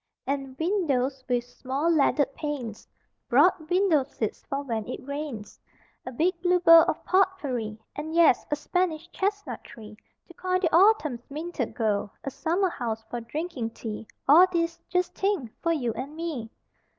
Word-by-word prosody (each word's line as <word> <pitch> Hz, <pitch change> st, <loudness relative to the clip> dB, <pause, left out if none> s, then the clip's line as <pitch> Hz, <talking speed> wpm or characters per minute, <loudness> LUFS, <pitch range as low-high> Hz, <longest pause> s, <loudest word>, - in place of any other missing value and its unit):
And 270 Hz, -1 st, -3 dB
windows 280 Hz, -7 st, 0 dB
with 245 Hz, -1 st, +1 dB
small 265 Hz, +5 st, -3 dB
leaded 290 Hz, -3 st, +3 dB
panes, 265 Hz, -9 st, -5 dB, 0.4 s
Broad 315 Hz, -3 st, +4 dB
window 360 Hz, -4 st, +3 dB
seats 225 Hz, -5 st, -4 dB
for 275 Hz, +1 st, -2 dB
when 225 Hz, -5 st, -3 dB
it 255 Hz, +1 st, -7 dB
rains; 280 Hz, -7 st, -6 dB, 0.5 s
A -, -, -3 dB
big 340 Hz, +7 st, 0 dB
blue 360 Hz, 0 st, +3 dB
bowl 330 Hz, -2 st, +9 dB
of -, -, -2 dB
pot 380 Hz, 0 st, +3 dB
pourri 240 Hz, -, -4 dB, 0.2 s
And 315 Hz, +2 st, -5 dB
yes, 335 Hz, -7 st, +5 dB
a 295 Hz, -, +1 dB
Spanish 335 Hz, +1 st, -1 dB
chestnut 405 Hz, +1 st, -2 dB
tree 215 Hz, -2 st, -12 dB, 0.3 s
To 345 Hz, -, -14 dB
coin 370 Hz, +1 st, -1 dB
the 335 Hz, -4 st, +1 dB
autumn's 330 Hz, -, +3 dB
minted 300 Hz, -4 st, -4 dB
gold. 210 Hz, -3 st, 0 dB
A 275 Hz, -, -4 dB
summer 350 Hz, +7 st, 0 dB
house 225 Hz, -7 st, -4 dB
for 240 Hz, -, -3 dB
drinking 245 Hz, -2 st, -4 dB
tea 220 Hz, -1 st, -6 dB, 0.2 s
All 330 Hz, +7 st, +8 dB
these 335 Hz, -1 st, -1 dB
(just 360 Hz, -1 st, 0 dB
think!) 385 Hz, -, -1 dB
for 335 Hz, -, +1 dB
you 250 Hz, -8 st, 0 dB
and 275 Hz, +6 st, -6 dB
me. 315 Hz, -9 st, -4 dB
295 Hz, 160 wpm, -27 LUFS, 245-345 Hz, 0.5 s, bowl